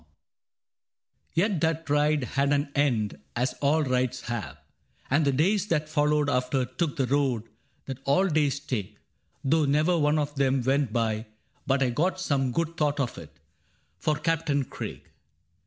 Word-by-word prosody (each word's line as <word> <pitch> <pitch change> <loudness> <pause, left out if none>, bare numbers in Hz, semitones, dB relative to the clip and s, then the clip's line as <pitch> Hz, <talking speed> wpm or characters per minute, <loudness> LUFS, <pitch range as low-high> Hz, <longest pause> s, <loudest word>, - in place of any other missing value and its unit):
II - - -28 1.3
Yet 185 -1 +1
that 160 0 0
ride 150 0 +2
had 140 +3 0
an 145 0 0
end, 120 -8 +1 0.2
as 125 +2 0
all 150 +2 +3
rides 130 -1 0
have; 120 -6 -5 0.5
And 145 +2 +3
the 140 - +3
days 190 +9 +2
that 155 -4 0
followed 150 -1 +2
after 125 -1 +1
took 140 +4 -2
the 135 - +1
road 130 -4 +1 0.4
That 135 -1 -6
all 145 +8 +3
days 150 -4 +1
take, 105 -7 -4 0.3
— 80 - -42
though 155 +3 +3
never 155 +5 +2
one 150 0 +3
of 145 -1 -1
them 135 -2 +1
Went 135 -1 +1
by 110 -1 -1 0.4
but 135 0 +3
I 125 - +1
got 180 +9 0
some 135 -7 0
good 165 +5 -2
thought 150 -2 +1
of 125 -4 -2
it - - -13 0.6
For 150 +10 +1
Captain 150 -2 0
Craig. - - -7
145 Hz, 165 wpm, -27 LUFS, 130-155 Hz, 1.3 s, all